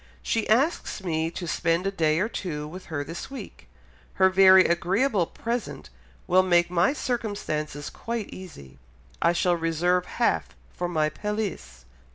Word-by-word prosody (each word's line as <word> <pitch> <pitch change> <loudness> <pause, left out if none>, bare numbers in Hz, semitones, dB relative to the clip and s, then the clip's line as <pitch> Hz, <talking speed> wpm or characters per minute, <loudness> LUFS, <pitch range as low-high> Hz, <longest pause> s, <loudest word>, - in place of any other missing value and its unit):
She 225 -2 -1
asks 255 - +1
me 160 -2 -1
to 175 +1 -6
spend 170 +2 0
a 195 - 0
day 160 -5 +1
or 205 - +1
two 150 -9 -5
with 180 +4 -9
her 145 -3 -3
this 165 - -7
week... 265 -7 -10 0.5
her 190 0 +4
very 190 0 +7
agreeable 185 +3 +1
present 235 +1 -5 0.3
will 185 +1 +5
make 175 -2 +3
my 180 +6 +3
circumstances 205 - -3
quite 230 -2 -4
easy; 70 - -11 0.4
I 170 - +4
shall 175 0 +2
reserve 170 +2 0
half 240 - 0 0.2
for 175 - -3
my 155 -3 +1
pelisse." 210 - -5
180 Hz, 150 wpm, -26 LUFS, 165-210 Hz, 0.5 s, very